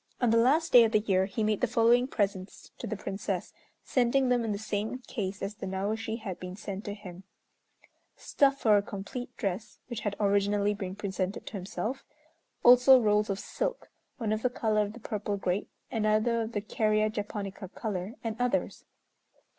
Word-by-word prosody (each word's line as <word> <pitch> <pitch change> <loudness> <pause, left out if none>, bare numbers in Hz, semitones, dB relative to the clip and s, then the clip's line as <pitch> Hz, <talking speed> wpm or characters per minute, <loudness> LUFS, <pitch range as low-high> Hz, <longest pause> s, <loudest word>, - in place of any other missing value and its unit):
On 245 -3 +3
the 230 - +4
last 295 +8 +3
day 245 -2 +10
of 225 0 +1
the - - +6
year 190 -3 +1
he 215 +2 -2
made 215 -1 +1
the 250 - +3
following 240 +1 +4
presents 195 -5 -3
to 235 - -5
the 215 0 -3
Princess, 195 -2 -4 0.3
sending 255 +1 +2
them 245 -1 +2
in 225 - -1
the 200 - -1
same 215 +2 -3
case 205 -6 -5
as 200 - -3
the 195 - -7
Naoshi 215 +4 -2
had 190 -5 -5
been 180 0 -7
sent 200 -1 -6
to 205 -1 -4
him: 190 -3 -10 0.9
stuff 275 -1 +2
for 215 -2 +5
a - - +3
complete 205 +5 -6
dress, 205 0 -3
which 240 -3 -4
had 205 -2 -2
originally 205 0 +2
been 190 -2 -5
presented 195 -1 -3
to - - -9
himself; 215 +6 -4 0.6
also 250 +2 +8
rolls 210 -2 +2
of 195 - -1
silk, - - -4 0.3
one 220 -4 -1
of 215 - -2
the 250 - +2
color 220 -3 +1
of 205 0 -2
the 235 - -10
purple 210 -2 -3
grape, 190 0 -1 0.2
another 220 +1 +2
of 225 +1 -4
the 205 - -1
Kerria 215 0 +1
japonica 205 -2 -5
color, 205 +1 -4
and 225 -2 -2
others. 245 0 -1
215 Hz, 185 wpm, -29 LUFS, 200-230 Hz, 0.9 s, day